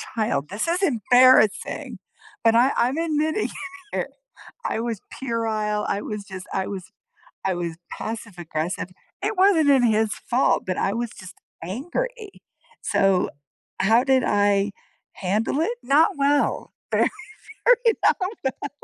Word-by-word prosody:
child. 150 -10 -1
This 205 - -3
is 350 +3 0
embarrassing! 250 - +3 0.4
But 225 0 +4
I 250 +4 +5
I'm 255 +5 +1
admitting 315 +3 0
it - - -4 0.4
here. - - -2 0.6
I - - -1
was 230 -4 -3 0.2
puerile. 220 -4 -1
I 200 - -1
was 210 -2 -5
just 190 -2 -9
I 190 0 -1
was 190 -3 -6 0.6
I 190 - +1
was 170 -2 -4 0.2
passive 225 -2 -6
aggressive. 165 +1 -3 0.3
It 440 - -1
wasn't 375 -5 +5
even 265 -3 +5
his 220 -1 +2
fault, 255 +1 +1
but 185 -1 -1
I 195 - 0
was 235 -1 -2
just 185 -2 -12 0.3
angry. 390 - -5 0.4
So, 195 -2 +2 0.5
how 225 +6 +4
did 265 -1 +3
I 205 0 +2 0.4
handle 210 +9 -1
it? 470 +9 0
Not 305 +8 +4
well, 285 +1 +1 0.2
very, - - +3 0.6
very 485 -2 +5
not - - +5 0.3
well. 265 +1 -3
230 Hz, 140 wpm, -23 LUFS, 200-285 Hz, 0.6 s, I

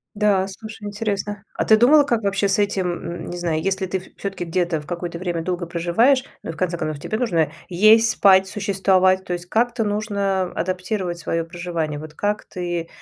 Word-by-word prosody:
Да, 205 -2 +2
слушай, 215 +2 -9
интересно. 205 -1 -3
А - - -1
ты 220 - +6
думала, 285 +6 +6
как 235 -5 0
вообще 200 0 +1
с 210 - +2
этим, 200 -2 0
м, 175 0 -6
не 175 - -5
знаю, 165 -3 -1
если 190 +1 -1
ты 190 +1 -2
в 185 - -16
всё-таки 195 -3 -4
где-то 170 -2 -1
в 150 - -14
какое-то 170 -1 -5
время 175 -2 -2
долго 175 0 -3
проживаешь, 180 +11 +2 0.2
ну, 165 - -4
в - - -12
конце 175 -2 -1
концов, 155 -2 -4
тебе 215 - -2
нужно 170 -11 +1 0.2
есть, 215 +5 +5
спать, 190 -1 +5
существовать, 190 -2 +2
то 180 - -5
есть 175 0 -4
как-то 235 +3 +1
нужно 200 -3 -1
адаптировать 180 0 -2
свое 165 0 -1
проживание. 165 -3 -4
Вот 155 0 -9
как 205 +5 -1
ты, 175 -2 -4
190 Hz, 195 wpm, -22 LUFS, 175-205 Hz, 0.2 s, ты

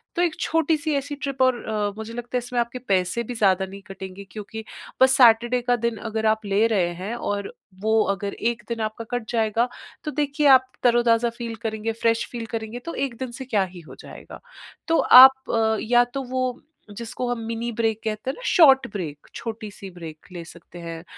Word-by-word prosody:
तो 350 - +1
एक 340 -3 +1
छोटी-सी 315 -1 0
ऐसी 285 +1 -3
ट्रिप 275 -2 -4
और 255 -2 +1
अ, 210 -1 -1
मुझे 220 +1 -7
लगता 240 +1 -4
है - - +2
इसमें 245 0 -3
आपके 235 +2 -5
पैसे 185 +6 0
भी 245 - -6
ज़्यादा 190 -3 +2
नहीं 195 +1 -11
कटेंगे 190 0 -9
क्योंकि 220 +1 -7 0.4
बस 260 0 +6
सैटरडे 240 0 +5
का 245 - +5
दिन 225 -2 -3
अगर 220 0 -2
आप 220 -1 -18
ले 200 +2 +2
रहे 185 -6 +1
हैं 215 +5 -3
और 205 -4 -3 0.3
वो 220 +1 +3
अगर 200 +1 -5 0.2
1 235 - -10
दिन 230 -1 -3
आपका 220 +1 -4
कट 240 - -7
जाएगा 230 +1 +1 0.3
तो 300 - -3
देखिए 290 +1 0
आप 260 -1 +6
तरोताज़ा 235 -1 +3
फ़ील 235 -1 -6
करेंगे, 220 0 -2
फ़्रेश 230 0 0
फ़ील 235 -2 -5
करेंगे, 225 +1 -5
तो 335 +6 -7
1 265 -4 -3
दिन 255 -1 -5
से 260 +2 -8
क्या 210 -6 +1
ही - - -8
हो 155 - -13
जाएगा? - - -11 0.5
तो 330 - +3
आप 250 -4 +7
या 240 +2 +4
तो 265 +2 -5
वो 255 0 -3 0.4
जिसको 235 +2 -4
हम 240 - -2
मिनी 230 +1 -3
ब्रेक 225 -1 0
कहते 215 +2 -3
हैं - - -11
ना, - - -13
शॉर्ट 275 -7 +6
ब्रेक, 160 -8 -6
छोटी-सी 215 -3 -7
ब्रेक 165 -3 -11
ले 170 -1 -6
सकते 170 +1 -13
हैं। 165 -1 -7
230 Hz, 200 wpm, -23 LUFS, 210-255 Hz, 0.5 s, आप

